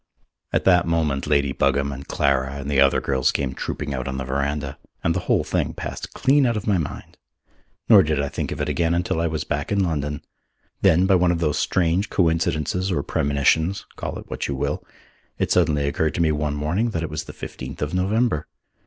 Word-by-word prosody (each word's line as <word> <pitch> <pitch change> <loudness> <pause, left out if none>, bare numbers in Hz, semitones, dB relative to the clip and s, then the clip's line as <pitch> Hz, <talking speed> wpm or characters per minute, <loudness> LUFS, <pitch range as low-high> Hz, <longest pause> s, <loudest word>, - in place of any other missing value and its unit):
At - - +1
that 90 -3 +4
moment 80 -5 0
Lady 70 -2 +2
Buggam 70 +1 +1
and 70 0 -8
Clara 70 -1 +1
and 70 +1 -5
the 70 -1 +4
other 70 0 +4
girls 65 -2 +1
came 65 -2 -2
trooping 70 - -4
out 65 0 -3
on 65 -1 -3
the 65 - -3
verandah, 70 +1 -2 0.2
and 85 - +2
the 95 - -1
whole - - +3
thing - - -1
passed - - -6
clean 140 +2 +4
out 115 -2 0
of 105 - -4
my 100 -4 +2
mind. 75 - -6 0.7
Nor 105 -4 +8
did 75 -4 0
I 70 - 0
think 70 - -4
of - - -4
it - - -1
again 85 0 +1
until 85 -1 0
I 85 - +1
was 80 -1 -2
back 75 +6 -3
in 100 -1 +2
London. 75 -4 -2 0.6
Then, 90 +3 +5
by 95 - +4
one 90 -1 +4
of 85 - 0
those 75 -2 0
strange 90 +5 +1
coincidences 85 +1 0
or 75 -6 0
premonitions 80 +7 +1
call - - -5
it - - -10
what - - -4
you 70 - -2
will - - -2 0.5
it - - -1
suddenly 75 -5 +2
occurred 80 +2 0
to - - 0
me 80 -2 +3
one 75 -1 -1
morning 85 +11 0
that 85 -7 -2
it 80 - -4
was 75 0 -4
the - - -8
fifteenth 65 +3 -8
of 75 - -3
November. 95 -2 +1
75 Hz, 215 wpm, -23 LUFS, 70-90 Hz, 0.7 s, Nor